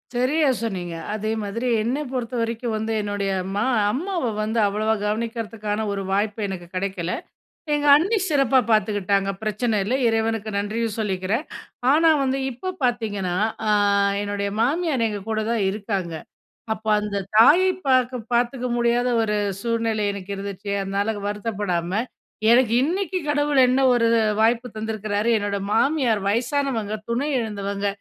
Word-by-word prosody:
சரியா 285 Hz, +5 st, +2 dB
சொன்னீங்க. 180 Hz, -7 st, -3 dB, 0.2 s
அதே 215 Hz, 0 st, -3 dB
மாதிரி 220 Hz, +5 st, -3 dB
என்ன 240 Hz, +5 st, -1 dB
பொறுத்த 250 Hz, -2 st, -3 dB
வரைக்கும் 230 Hz, 0 st, -2 dB
வந்து 220 Hz, +1 st, -2 dB
என்னுடைய 205 Hz, -1 st, -2 dB, 0.2 s
மா 205 Hz, -, +1 dB, 0.3 s
அம்மாவ 335 Hz, -, -2 dB
வந்து 220 Hz, +2 st, -1 dB
அவ்வளவா 215 Hz, +2 st, 0 dB
கவனிக்கிறதுக்கான 220 Hz, -1 st, -2 dB
ஒரு 200 Hz, -1 st, -2 dB
வாய்ப்பு 205 Hz, +2 st, 0 dB
எனக்கு 180 Hz, -3 st, -6 dB
கிடைக்கல. 185 Hz, -2 st, -2 dB, 0.6 s
எங்க 295 Hz, 0 st, 0 dB
அண்ணி 380 Hz, +10 st, +2 dB
சிறப்பாக 270 Hz, -3 st, +3 dB
பார்த்துக்கிட்டாங்க. 200 Hz, -2 st, +1 dB
பிரச்சனை 215 Hz, +2 st, 0 dB
இல்ல, 210 Hz, +6 st, -2 dB
இறைவனுக்கு 225 Hz, -1 st, 0 dB
நன்றியும் 215 Hz, +2 st, -2 dB
சொல்லிக்கிறேன். 200 Hz, +4 st, -1 dB, 0.5 s
ஆனா 320 Hz, +3 st, +5 dB
வந்து 265 Hz, 0 st, 0 dB
இப்ப 370 Hz, +10 st, -5 dB
பார்த்தீங்கன்னா, 210 Hz, -7 st, -1 dB, 0.3 s
ஆ, -, -, +2 dB, 0.5 s
என்னுடைய 205 Hz, 0 st, -2 dB
மாமியார் 280 Hz, -1 st, +1 dB
எங்க 205 Hz, -1 st, -5 dB
கூட 220 Hz, -1 st, 0 dB
தான் 230 Hz, -3 st, +1 dB
இருக்காங்க. 195 Hz, -4 st, -3 dB, 0.6 s
அப்போ 220 Hz, 0 st, -5 dB
அந்த 210 Hz, -1 st, -3 dB, 0.2 s
தாயை 345 Hz, +12 st, +7 dB, 0.2 s
பார்க்க 255 Hz, -1 st, +3 dB
பார்த்துக்க 245 Hz, +1 st, +1 dB
முடியாத 240 Hz, +1 st, +2 dB
ஒரு 210 Hz, -1 st, 0 dB, 0.2 s
சூழ்நிலை 225 Hz, -1 st, 0 dB
எனக்கு 200 Hz, -1 st, -8 dB
இருந்துச்சு. 200 Hz, +1 st, -6 dB
அதனால 200 Hz, +3 st, -1 dB, 0.2 s
வருத்தப்படாம 205 Hz, -5 st, -2 dB, 0.6 s
எனக்கு 240 Hz, -1 st, +5 dB
இன்னைக்கு 370 Hz, +5 st, -1 dB
கடவுள் 290 Hz, -1 st, +1 dB
என்ன 255 Hz, +2 st, +2 dB
ஒரு 235 Hz, -1 st, +3 dB, 0.3 s
வாய்ப்பு 230 Hz, +2 st, +2 dB
தந்திருக்கிறாரு, 215 Hz, 0 st, -2 dB
என்னோட 205 Hz, -1 st, -1 dB
மாமியார் 245 Hz, -2 st, +2 dB
வயசானவங்க. 235 Hz, 0 st, 0 dB
துணை 245 Hz, +5 st, -1 dB
எழுந்தவங்க. 200 Hz, -3 st, -3 dB
220 Hz, 135 wpm, -23 LUFS, 205-245 Hz, 0.6 s, தாயை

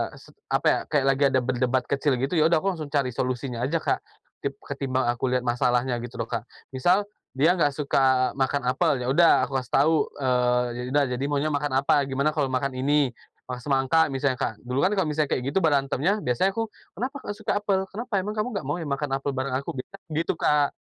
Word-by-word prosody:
sep -, -, -16 dB, 0.2 s
apa -, -, +2 dB
ya, -, -, +3 dB
kayak 140 Hz, -3 st, +1 dB
lagi 140 Hz, +1 st, 0 dB
ada 130 Hz, -, +3 dB
berdebat 125 Hz, 0 st, 0 dB
kecil 140 Hz, -1 st, +1 dB
gitu, 135 Hz, +7 st, -1 dB
ya 155 Hz, -, +5 dB
udah -, -, +6 dB
aku 195 Hz, -, +1 dB
langsung 155 Hz, -3 st, -6 dB
cari 140 Hz, -4 st, +1 dB
solusinya 125 Hz, 0 st, -3 dB
aja, 155 Hz, +6 st, 0 dB
Kak. -, -, +1 dB, 0.4 s
Tip 140 Hz, 0 st, -2 dB
ketimbang 135 Hz, -3 st, -2 dB
aku 120 Hz, +2 st, -2 dB
lihat 125 Hz, -1 st, +1 dB
masalahnya 125 Hz, +1 st, +1 dB
gitu 120 Hz, -, -8 dB
loh, -, -, -2 dB
Kak. -, -, -3 dB, 0.3 s
Misal, 175 Hz, +10 st, +2 dB, 0.3 s
dia 155 Hz, +6 st, +4 dB
nggak 145 Hz, -4 st, +3 dB
suka 135 Hz, -3 st, +2 dB
makan 135 Hz, +1 st, 0 dB
apel, 125 Hz, +1 st, +1 dB
ya -, -, -3 dB
udah 165 Hz, +3 st, +5 dB
aku 135 Hz, -1 st, -1 dB
kasih 125 Hz, -1 st, -11 dB
tahu, 155 Hz, +4 st, +4 dB, 0.2 s
eee, 125 Hz, -2 st, +2 dB
“Ya 125 Hz, -, -4 dB
udah, 145 Hz, 0 st, +4 dB
jadi 130 Hz, -, -4 dB
maunya 145 Hz, +1 st, 0 dB
makan 145 Hz, 0 st, -1 dB
apa, -, -, +3 dB
gimana 140 Hz, +3 st, +1 dB
kalau 145 Hz, -3 st, +1 dB
makan 130 Hz, +1 st, 0 dB
ini, 140 Hz, -1 st, +2 dB, 0.4 s
mah 125 Hz, -, -4 dB
semangka 140 Hz, +4 st, +3 dB
misalnya?” 135 Hz, -1 st, 0 dB
Kak. 110 Hz, -, -3 dB
Dulu 125 Hz, +2 st, -2 dB
kan 185 Hz, -, +3 dB
kalau 190 Hz, -5 st, +1 dB
misalnya 150 Hz, -1 st, 0 dB
kayak 125 Hz, -, -3 dB
gitu 195 Hz, -, +2 dB
berantemnya, 145 Hz, +6 st, +2 dB
biasanya 125 Hz, +11 st, +1 dB
aku, 225 Hz, 0 st, -1 dB, 0.3 s
“Kenapa 255 Hz, -, -3 dB
kok 205 Hz, -5 st, -6 dB
suka 210 Hz, -1 st, -1 dB
apel? 195 Hz, -2 st, 0 dB
Kenapa? 230 Hz, +3 st, -7 dB
Emang 210 Hz, +2 st, -4 dB
kamu 230 Hz, +4 st, 0 dB
nggak 195 Hz, -, -2 dB
mau 145 Hz, -, -1 dB
ya 160 Hz, -, -5 dB
makan 140 Hz, +1 st, -2 dB
apel 140 Hz, +1 st, -2 dB
bareng 130 Hz, 0 st, -2 dB
aku?” 140 Hz, -, -5 dB, 0.4 s
Gitu, 165 Hz, +2 st, +1 dB
Kak. 145 Hz, -1 st, +2 dB
140 Hz, 220 wpm, -25 LUFS, 130-155 Hz, 0.4 s, udah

